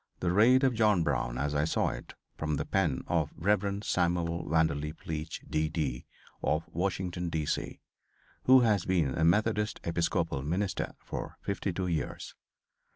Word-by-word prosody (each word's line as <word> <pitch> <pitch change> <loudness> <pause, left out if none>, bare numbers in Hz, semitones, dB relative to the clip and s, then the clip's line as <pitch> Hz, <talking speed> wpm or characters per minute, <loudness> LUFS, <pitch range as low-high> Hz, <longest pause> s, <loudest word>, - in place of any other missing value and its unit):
"The 85 - 0
Raid 120 +8 +5
Of 130 -2 +4
John 105 -6 +3
Brown - - -1
As 70 +3 -1
I 75 0 +2
Saw 80 - +1
It" - - -8 0.2
from 75 -1 -1
the - - -2
pen 80 -9 0
| - - -23
| - - -27
of 80 -3 0
"Rev. 100 +2 +1
Samuel 85 -2 0
Vanderlip 75 -1 0
Leech, 80 0 -4
D. 80 0 0
D., 75 -7 -3 0.3
of 75 +2 0
Washington, 90 0 -2
D. 80 -2 -1
C.," - - -3 0.2
| - - -41
| - - -33
who 130 0 +8
has 105 -6 +3
been 85 -8 +1
a 80 - 0
Methodist 105 +5 +2
Episcopal 85 -3 0
Minister 90 +7 -2
for - - -5
52 95 -2 -2
years. 85 -4 -3
85 Hz, 170 wpm, -30 LUFS, 75-100 Hz, 0.3 s, who